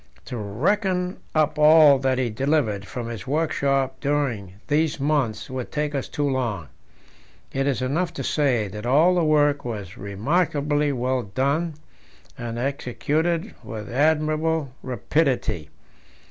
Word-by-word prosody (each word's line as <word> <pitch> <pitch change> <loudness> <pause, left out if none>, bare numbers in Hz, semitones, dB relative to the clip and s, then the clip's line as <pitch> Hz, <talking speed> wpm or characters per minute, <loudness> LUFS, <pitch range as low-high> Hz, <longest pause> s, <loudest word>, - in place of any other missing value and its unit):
To - - -6
reckon 180 - 0 0.2
up 155 0 +2
all 150 -2 +7
that 130 -1 +1
he 125 -3 0
delivered 115 -5 0
from 120 -2 -5
his 115 -3 -7
workshop 140 -3 0
during 135 -10 -1
these 155 +1 +1
months 135 -7 0
would 130 -2 -5
take 150 0 -1
us 135 -2 -2
too 145 -2 -1
long; 115 - -2 0.8
it 135 +1 0
is 130 -2 0
enough 165 +7 0
to - - -5
say 130 -8 +1
that 105 +4 -6
all 155 +8 +5
the 175 -2 +2
work 145 -2 +3
was 105 -6 -6
remarkably 145 - 0
well 130 0 0
done, 140 - -1 0.6
and 115 -1 -5
executed 145 +6 -1
with 110 0 -7
admirable 155 +1 +1
rapidity. 125 - -1
140 Hz, 135 wpm, -24 LUFS, 120-155 Hz, 0.8 s, all